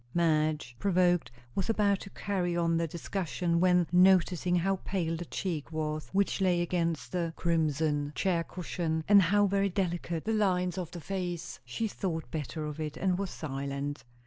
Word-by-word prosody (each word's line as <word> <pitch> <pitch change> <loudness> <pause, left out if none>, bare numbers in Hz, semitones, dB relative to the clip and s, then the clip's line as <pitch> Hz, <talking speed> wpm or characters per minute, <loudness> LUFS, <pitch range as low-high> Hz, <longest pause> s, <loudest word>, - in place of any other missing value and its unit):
Madge, 155 -6 +1
provoked, 180 -7 +2 0.2
was 195 - -2
about 205 -3 +2
to - - -9
carry 180 -4 -2
on 170 -1 +2
the 165 0 +1
discussion, 170 +1 -2
when, 180 -1 +4
noticing 180 -1 +4
how 190 +2 +1
pale 175 -3 -2
the 175 +1 -5
cheek 165 -4 -4
was 155 -1 -3
which 200 0 +1
lay 180 -2 +3
against 165 -8 -1
the 170 -2 -1
crimson 155 -3 0
chair 170 +2 +1
cushion, 165 -2 -3
and 205 -1 +8
how 205 +4 +4
very 200 0 +2
delicate 175 -3 -2
the 225 - 0
lines 185 -4 +1
of 175 -3 -4
the 170 -1 -8
face, 175 -2 -4
she 170 - -2
thought 170 -6 -4
better 155 0 -4
of 150 0 -6
it 155 -1 -4
and 185 -1 +1
was 200 -2 -2
silent. 140 -1 -4
175 Hz, 170 wpm, -30 LUFS, 160-185 Hz, 0.2 s, and